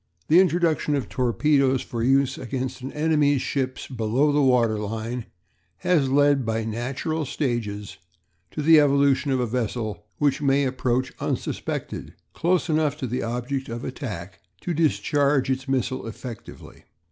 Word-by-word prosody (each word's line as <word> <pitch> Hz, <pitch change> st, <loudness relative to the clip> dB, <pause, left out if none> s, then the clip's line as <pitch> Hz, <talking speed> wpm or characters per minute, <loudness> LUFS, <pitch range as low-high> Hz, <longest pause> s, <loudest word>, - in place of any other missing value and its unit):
The 165 Hz, +4 st, +7 dB
introduction 170 Hz, -4 st, +2 dB
of 140 Hz, -, -3 dB
torpedoes 135 Hz, +1 st, +2 dB
for 115 Hz, -, -5 dB
use 135 Hz, +2 st, +3 dB
against 130 Hz, +1 st, -4 dB
an 135 Hz, +2 st, -5 dB
enemy's 150 Hz, -3 st, +2 dB
ships 130 Hz, -2 st, -2 dB
below 125 Hz, +4 st, +1 dB
the 145 Hz, 0 st, +2 dB
waterline 115 Hz, -2 st, 0 dB, 0.5 s
has 155 Hz, -7 st, +2 dB
led 145 Hz, 0 st, +4 dB
by 115 Hz, -1 st, -1 dB
natural 135 Hz, +8 st, -2 dB
stages 115 Hz, -, -3 dB, 0.5 s
to 150 Hz, -, -4 dB
the 160 Hz, +1 st, +7 dB
evolution 140 Hz, -1 st, +3 dB
of 130 Hz, -1 st, +1 dB
a 125 Hz, -, +1 dB
vessel 110 Hz, -3 st, -3 dB
which 145 Hz, -1 st, +1 dB
may 140 Hz, 0 st, +3 dB
approach 130 Hz, 0 st, -1 dB
unsuspected -, -, -4 dB, 0.2 s
close 175 Hz, +1 st, +1 dB
enough 155 Hz, -2 st, +1 dB
to 135 Hz, -, -4 dB
the 125 Hz, +1 st, -2 dB
object 125 Hz, +3 st, -3 dB
of 120 Hz, +1 st, -5 dB
attack 100 Hz, -, -6 dB, 0.2 s
to 175 Hz, -, -2 dB
discharge 145 Hz, -3 st, +2 dB
its 130 Hz, +1 st, -2 dB
missile 130 Hz, -2 st, -1 dB
effectively. 115 Hz, 0 st, -10 dB
130 Hz, 140 wpm, -24 LUFS, 120-145 Hz, 0.5 s, The